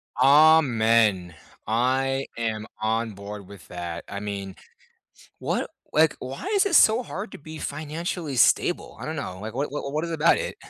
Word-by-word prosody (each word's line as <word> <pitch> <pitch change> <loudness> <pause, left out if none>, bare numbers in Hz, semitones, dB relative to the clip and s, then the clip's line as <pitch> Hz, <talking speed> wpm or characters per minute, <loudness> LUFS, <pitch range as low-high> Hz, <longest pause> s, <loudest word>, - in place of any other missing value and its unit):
Amen. 115 - +4 0.3
I 130 +4 +1
am 110 -2 -2 0.2
on 110 0 -1
board 100 0 -9
with 100 -3 -13
that, 85 -1 -6
I 100 - -5
mean, 100 -2 -5 0.8
what - - -2 0.2
like, 155 0 +3
why 130 - -7
is 405 0 +3
it 355 - 0
so 225 -2 +6
hard 200 -3 -7
to - - -9
be 155 +1 -10
financially 155 0 -4
stable? - - +2
I - - -6
don't - - -4
know, 95 +1 -5
like, 110 +2 -7
what 140 +1 -2
what 140 -1 -5
what 155 +2 -1
is 170 - -5
about 165 - +3
it? - - -4
130 Hz, 170 wpm, -25 LUFS, 105-155 Hz, 0.8 s, so